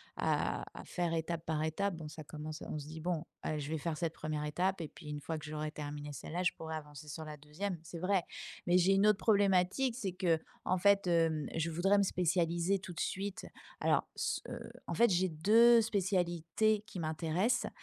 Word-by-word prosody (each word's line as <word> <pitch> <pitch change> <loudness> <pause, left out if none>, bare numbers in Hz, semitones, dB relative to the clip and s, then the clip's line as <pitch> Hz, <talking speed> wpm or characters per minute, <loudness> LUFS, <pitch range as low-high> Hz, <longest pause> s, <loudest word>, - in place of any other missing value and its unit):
à - - 0
à - - -9
faire 175 -2 -1
étape 165 0 -2
par 155 -1 0
étape 180 +5 0
bon 160 -2 -7
ça 155 0 -8
commence 155 +1 -7
on 155 - -4
se 145 - -8
dit: 160 +1 -8
«Bon, 170 -1 -1 0.2
aller 155 - -2
je 145 0 -4
vais 160 - -1
faire 155 +1 -2
cette 165 -1 -1
1re 155 -2 -3
étape 180 +5 0
et 160 - -3
puis 155 - -13
une 150 0 -3
fois 160 +2 -3
que 150 - -9
j'aurai 155 0 -3
terminé 145 -1 -6
celle-là 160 +6 -4
je 180 - +2
pourrais 160 0 -5
avancer 150 -1 -10
sur 160 +2 -6
la 155 0 -6
2e». 155 +6 -4
C'est 170 0 -8
vrai 185 -1 +2 0.4
mais 175 0 +4
j'ai 185 +2 +5
une 195 +2 +4
autre 210 -2 +5
problématique 200 +4 +3
c'est 195 -7 -2
qu'en 180 0 0
fait, 200 +1 +4
hem, 165 -3 +2
je 165 0 0
voudrais 185 +5 +3
me 200 - +4
spécialiser 175 +1 +1
tout 185 -1 -8
de - - -7
suite 195 +1 -3 0.4
alors, - - +2
ce, - - -1
heu, - - -7 0.2
en - - -2
fait 235 - +5
j'ai 180 +1 +3
2 225 +8 +6
spécialités 190 0 +1
qui 180 - -7
m'intéressent 165 +8 0
170 Hz, 210 wpm, -34 LUFS, 155-190 Hz, 0.4 s, 2